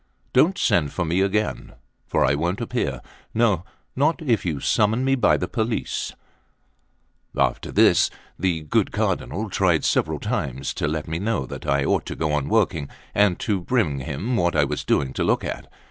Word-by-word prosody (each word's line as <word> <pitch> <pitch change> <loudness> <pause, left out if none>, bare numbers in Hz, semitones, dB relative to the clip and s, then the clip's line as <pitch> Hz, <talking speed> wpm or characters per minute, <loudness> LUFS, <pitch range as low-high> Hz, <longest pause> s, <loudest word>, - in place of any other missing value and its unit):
Don't 170 +9 +4
send 75 -4 +2
for 90 - -2
me 85 +4 +1
again, 105 +2 -1 0.3
for - - +2
I 70 - +3
won't 85 +6 -1
appear, 115 - -2 0.3
no, 110 -7 +2 0.3
not 150 +6 +2
if 120 -8 +1
you 75 -4 -1
summon 110 - +2
me 135 - +3
by 130 - +3
the - - -2
police." 110 -1 -2 1.2
After - - 0
this, - - +5 0.3
the 85 -2 0
good 75 - +1
Cardinal 105 +8 -1
tried 90 -5 +2
several - - +1
times 70 +1 -2
to - - -1
let 75 0 -3
me 80 +1 -3
know 105 -6 -1
that - - -8
I 70 0 +2
ought - - +1
to - - -4
go 75 -2 -1
on 75 -2 0
working, 70 - +1 0.2
and 100 -3 +3
to 100 -4 0
bring 85 - 0
him 80 - -3
what 85 -6 +1
I 75 - +4
was 70 - -2
doing 70 -2 +1
to - - -1
look - - +1
at. - - -5
90 Hz, 180 wpm, -23 LUFS, 75-110 Hz, 1.2 s, this